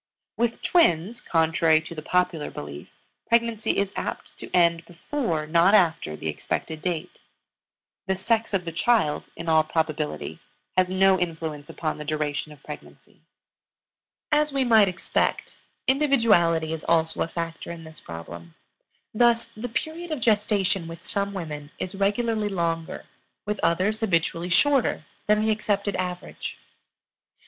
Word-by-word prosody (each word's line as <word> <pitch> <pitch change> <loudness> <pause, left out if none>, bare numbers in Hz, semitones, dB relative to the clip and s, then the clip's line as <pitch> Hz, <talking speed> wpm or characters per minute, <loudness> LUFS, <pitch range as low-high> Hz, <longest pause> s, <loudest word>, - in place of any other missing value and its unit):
With 235 +1 -1
twins, 235 - +3
contrary 160 -1 +3
to 160 - -8
the 155 - -6
popular 180 -2 0
belief, 75 0 -8 0.4
pregnancy 230 -2 +2
is 200 -1 0
apt - - -5
to - - -7
end 170 -1 +3
before, 170 - -2
not 170 +6 +5
after, 165 - +2
the 80 - -6
expected 155 - -3
date. 175 -2 -3 0.9
The 190 - +1
sex 225 +4 0
of 180 -2 -1
the 165 - -3
child, 175 -3 +2
in 165 - -7
all 160 -1 +5
probability, 155 -1 -2 0.4
has 185 -1 +3
no 190 0 +4
influence 160 -4 -4
upon 155 -2 -3
the - - -4
duration 150 0 -2
of 150 -2 -15
pregnancy. - - -11 1.1
As 300 0 +3
we 275 -1 +1
might 220 -4 +6
expect, 180 -1 -1 0.3
individuality 220 - +3
is 160 - -5
also 160 -1 +2
a - - +1
factor 165 0 -5
in 170 -1 -7
this 160 -1 -11
problem. 85 0 -9 0.6
Thus, 235 +1 +4
the 235 +3 -5
period 315 +8 -4
of 310 -3 -2
gestation 205 -5 +1
with 165 0 -9
some 200 -1 -2
women 150 -6 -6
is 185 - -4
regularly 210 +2 0
longer, 165 -3 -2 0.4
with 210 0 -2
others 190 +6 +2
habitually 170 -4 0
shorter 270 - +3 0.2
than 210 +1 +3
the 220 - +3
accepted 205 -1 0
average. 180 -1 -5
180 Hz, 140 wpm, -25 LUFS, 160-215 Hz, 1.1 s, might